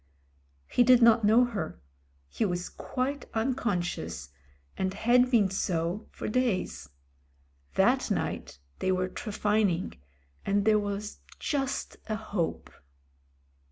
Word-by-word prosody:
He - - +2
did 245 0 +6
not 230 -1 +6
know 225 +4 +6
her 220 - -4 0.3
— 70 0 -38
he 70 - -2
was 180 -3 -1
quite 275 +3 -3
unconscious, 180 - -2 0.5
and 190 0 -2
had 245 +4 +4
been 215 -7 +3
so 180 +1 -1
for - - -6
days. 230 - -1 0.9
That - - +3
night - - -2 0.2
they 185 - +1
were 185 0 0
trephining, 205 - 0 0.4
and 200 0 +1
there 215 -1 +5
was 205 0 -4 0.2
just 275 -2 -2
a 215 - -1
hope. 205 -6 -3
210 Hz, 120 wpm, -29 LUFS, 185-240 Hz, 0.9 s, did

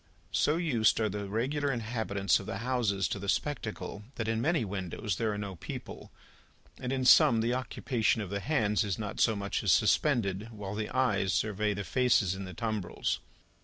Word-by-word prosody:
So 150 +8 +2
used 125 -13 +2
are 110 -1 +1
the 100 0 -4
regular 140 +7 0
inhabitants 110 - 0
of - - -9
the 95 - -3
houses 110 -7 +1
to 100 - -3
the 100 0 -4
spectacle, 115 -7 -2
that 110 - -3
in 115 0 0
many 155 -2 +1
windows 95 0 -3
there 110 -2 0
are 105 - -3
no 100 -3 -5
people, - - -8 0.7
and 125 - -3
in 130 -1 -1
some 115 -2 +7
the 115 +2 +1
occupation 125 -3 0
of 100 -4 -5
the 100 - -1
hands 110 -4 +1
is 100 -4 -2
not 105 -2 -5
so 110 - +4
much 100 0 -2
as - - +3
suspended, 110 -7 +2
while 105 -3 -6
the 105 0 -3
eyes 105 -7 +1
survey 105 -1 0
the 100 - -3
faces 105 -1 +2
in 95 0 -6
the 90 - -9
tumbrils. 110 -5 -2
110 Hz, 190 wpm, -30 LUFS, 100-125 Hz, 0.7 s, some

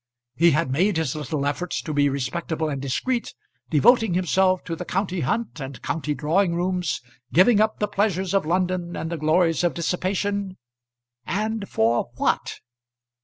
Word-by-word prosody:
He 170 +2 +4
had 155 -3 +1
made 180 +7 +2
his 160 -4 -1
little 150 -1 -3
effort 155 +5 -2
to 155 - -3
be 145 -1 +3
respectable 155 +4 -2
and 140 -2 -3
discreet, 235 - -2 0.3
devoting 220 - +4
himself 185 +1 +2
to 165 - -4
the 180 - -5
county 185 0 -2
hunt 165 - -2
and 135 -3 -7
county 150 -2 -2
drawing 170 +4 +1
rooms, 180 -1 -1 0.3
giving 205 +6 +5
up 215 0 +1
the 210 - 0
pleasures 195 -2 0
of 195 - +3
London 180 +1 -1
and 160 - -4
the 170 - -2
glories 165 +2 +2
of 175 - +1
dissipation. 190 +3 -1 0.7
And 215 +2 -2
for 115 +2 +1
what? - - -1
175 Hz, 160 wpm, -24 LUFS, 155-195 Hz, 0.7 s, giving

